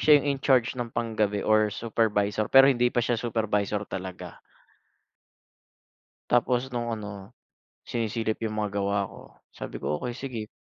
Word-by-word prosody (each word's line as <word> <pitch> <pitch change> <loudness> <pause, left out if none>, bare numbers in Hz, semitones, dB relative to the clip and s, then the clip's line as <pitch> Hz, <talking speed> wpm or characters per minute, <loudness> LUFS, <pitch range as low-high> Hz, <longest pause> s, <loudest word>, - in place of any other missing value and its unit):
siya 155 - +5
yung 145 - -3
in-charge 130 -3 +3
ng 120 -2 -4
panggabi 110 -3 0
or 110 0 +6 0.2
supervisor. 110 -2 +1
Pero, 135 0 +10
hindi 125 -1 +2
pa - - +2
siya 120 -2 0
supervisor 105 -3 0
talaga. 95 -1 -6 2.0
Tapos, 125 +1 +2
nung 120 -1 -2
ano 105 -3 -6 0.5
sinisilip 110 -1 -2
yung 110 - -4
mga 100 -1 -2
gawa 100 0 0
ko, - - -12 0.3
sabi - - -8
ko, 75 - -1
"Okey 120 -1 -4
sige." 120 -5 -5
110 Hz, 140 wpm, -27 LUFS, 105-120 Hz, 2.0 s, Pero